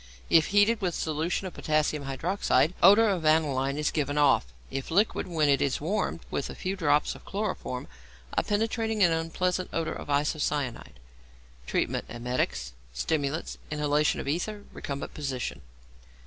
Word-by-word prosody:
If 160 Hz, -2 st, +6 dB
heated 205 Hz, +3 st, +3 dB
with 180 Hz, -3 st, 0 dB
solution 160 Hz, +4 st, -1 dB
of 185 Hz, -, -5 dB
potassium 150 Hz, -1 st, 0 dB
hydroxide, 160 Hz, +3 st, +1 dB
odour 205 Hz, +5 st, +7 dB
of 185 Hz, -5 st, 0 dB
aniline 145 Hz, -3 st, +2 dB
is 150 Hz, -1 st, 0 dB
given 145 Hz, -1 st, -1 dB
off; 145 Hz, -, +4 dB, 0.2 s
if 135 Hz, 0 st, -4 dB
liquid, 200 Hz, +6 st, +1 dB
when 160 Hz, -4 st, +1 dB
it 140 Hz, -1 st, +3 dB
is 140 Hz, -2 st, +1 dB
warmed 175 Hz, +1 st, -1 dB
with 140 Hz, -, -2 dB
a -, -, -7 dB
few 190 Hz, +1 st, -3 dB
drops 150 Hz, -5 st, +2 dB
of -, -, -13 dB
chloroform, 195 Hz, -11 st, -3 dB, 0.5 s
a -, -, +2 dB
penetrating 220 Hz, 0 st, 0 dB
and 170 Hz, -2 st, +5 dB
unpleasant 180 Hz, +3 st, -1 dB
odour 165 Hz, -1 st, -1 dB
of -, -, -8 dB
isocyanide. 145 Hz, -, -1 dB, 0.7 s
Treatment. -, -, 0 dB
Emetics, 120 Hz, -, -2 dB, 0.2 s
stimulants, 145 Hz, -, -2 dB
inhalation 150 Hz, 0 st, +1 dB
of -, -, -5 dB
ether, 205 Hz, +8 st, -2 dB
recumbent 140 Hz, 0 st, -5 dB
position. 130 Hz, -, -4 dB
155 Hz, 150 wpm, -28 LUFS, 140-185 Hz, 0.7 s, odour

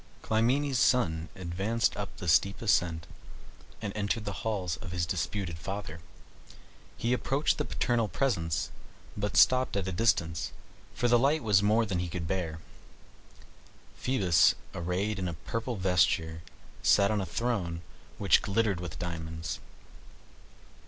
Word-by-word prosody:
Clymene's 125 Hz, +4 st, +1 dB
son 80 Hz, -11 st, +2 dB
advanced 95 Hz, +5 st, -1 dB
up 105 Hz, -1 st, -6 dB
the 90 Hz, -, -6 dB
steep 95 Hz, +4 st, +3 dB
ascent, 85 Hz, -6 st, +1 dB, 0.8 s
and 100 Hz, -2 st, -3 dB
entered 105 Hz, +1 st, -1 dB
the 100 Hz, -, -3 dB
halls 100 Hz, -7 st, -2 dB
of 95 Hz, -6 st, -8 dB
his 90 Hz, -1 st, -1 dB
disputed 85 Hz, 0 st, -3 dB
father. 95 Hz, -2 st, -5 dB, 1.0 s
He 120 Hz, +2 st, 0 dB
approached 135 Hz, +7 st, +1 dB
the 150 Hz, -, 0 dB
paternal 120 Hz, -3 st, 0 dB
presence, 85 Hz, -, -1 dB, 0.4 s
but 105 Hz, 0 st, -2 dB
stopped 130 Hz, -4 st, +5 dB
at 95 Hz, -1 st, -1 dB
a -, -, -1 dB
distance, 85 Hz, -5 st, +1 dB, 0.4 s
for 120 Hz, -, +1 dB
the 120 Hz, 0 st, +5 dB
light 145 Hz, +4 st, +2 dB
was 105 Hz, -3 st, +4 dB
more 110 Hz, +3 st, +3 dB
than 95 Hz, -4 st, -2 dB
he 90 Hz, -1 st, -2 dB
could 85 Hz, 0 st, -4 dB
bear. 80 Hz, -3 st, -2 dB, 1.3 s
Phoebus, 100 Hz, -10 st, +3 dB, 0.2 s
arrayed 95 Hz, +4 st, -2 dB
in 90 Hz, -, -2 dB
a 85 Hz, -, -4 dB
purple 115 Hz, +8 st, -4 dB
vesture, 85 Hz, -4 st, +1 dB, 0.4 s
sat 100 Hz, 0 st, +4 dB
on 105 Hz, -2 st, +1 dB
a -, -, -1 dB
throne, 90 Hz, -5 st, -2 dB, 0.3 s
which 100 Hz, -6 st, +4 dB
glittered 100 Hz, -2 st, +1 dB
as -, -, -7 dB
with 85 Hz, -4 st, -6 dB
diamonds. 80 Hz, -2 st, -5 dB
100 Hz, 140 wpm, -29 LUFS, 85-115 Hz, 1.3 s, stopped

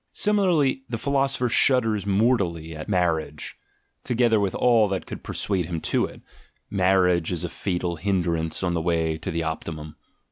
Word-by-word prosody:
Similarly, 180 Hz, -11 st, +2 dB
the 115 Hz, -, -2 dB
philosopher 135 Hz, 0 st, 0 dB
shudders 115 Hz, -5 st, +3 dB
mortally 95 Hz, -7 st, +1 dB
at 80 Hz, +4 st, -8 dB
marriage, 80 Hz, -5 st, -1 dB, 0.5 s
together 120 Hz, -2 st, +2 dB
with 100 Hz, -2 st, -1 dB
all 115 Hz, -3 st, +4 dB
that 95 Hz, -1 st, -3 dB
could -, -, -8 dB
persuade 95 Hz, -4 st, -2 dB
him 85 Hz, -2 st, -3 dB
to -, -, 0 dB
it -, -, -12 dB, 0.3 s
— -, -, -47 dB, 0.2 s
marriage 90 Hz, -3 st, +2 dB
as 85 Hz, -3 st, -3 dB
a -, -, -3 dB
fatal 90 Hz, -3 st, -3 dB
hindrance 85 Hz, -3 st, -1 dB
on 90 Hz, -1 st, 0 dB
the 85 Hz, -, -1 dB
way 80 Hz, -1 st, 0 dB
to 80 Hz, -, -5 dB
the 85 Hz, 0 st, -2 dB
optimum. 80 Hz, -1 st, -5 dB
95 Hz, 165 wpm, -24 LUFS, 85-115 Hz, 0.5 s, all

